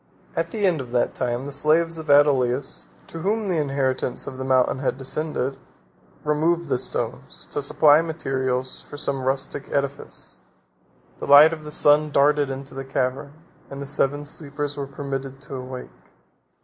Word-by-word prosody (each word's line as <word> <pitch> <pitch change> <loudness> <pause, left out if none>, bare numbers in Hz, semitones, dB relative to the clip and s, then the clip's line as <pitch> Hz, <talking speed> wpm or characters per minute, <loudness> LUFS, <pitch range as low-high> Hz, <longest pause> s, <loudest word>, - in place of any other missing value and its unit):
At 165 0 -1
the 205 +2 -1
end 170 -6 +2
of 125 - -8
that 120 - +1
time, 125 +1 -2
the 145 - -5
slaves 160 +3 +2
of 160 -1 -8
Adolius, 140 -2 +3 0.2
to 165 - -8
whom 210 +5 0
the 180 -4 0
inheritance 135 -3 -1
of 130 -1 -7
the - - -2
mountain 130 0 +2
had 135 - -1
descended, 135 -1 -3 0.6
removed 165 +3 +1
the 125 - +1
stones 130 - -4
to 145 - -1
supply 150 +1 +5
materials 130 -5 -2
for 145 - -8
some 140 -2 -2
rustic 135 +1 -1
edifice: 140 0 -3 0.8
the - - -5
light 145 +3 +9
of 155 -2 -7
the 150 - -8
sun 150 0 +4
darted 145 0 +3
into 135 +1 -6
the 135 0 -5
cavern, 135 +1 -2 0.4
and 140 - -7
the 140 - -5
Seven 145 +1 0
Sleepers 145 -1 -5
were 140 -1 -4
permitted 135 -1 -5
to 140 +1 -9
awake. 130 -1 -7
140 Hz, 165 wpm, -23 LUFS, 135-150 Hz, 0.8 s, light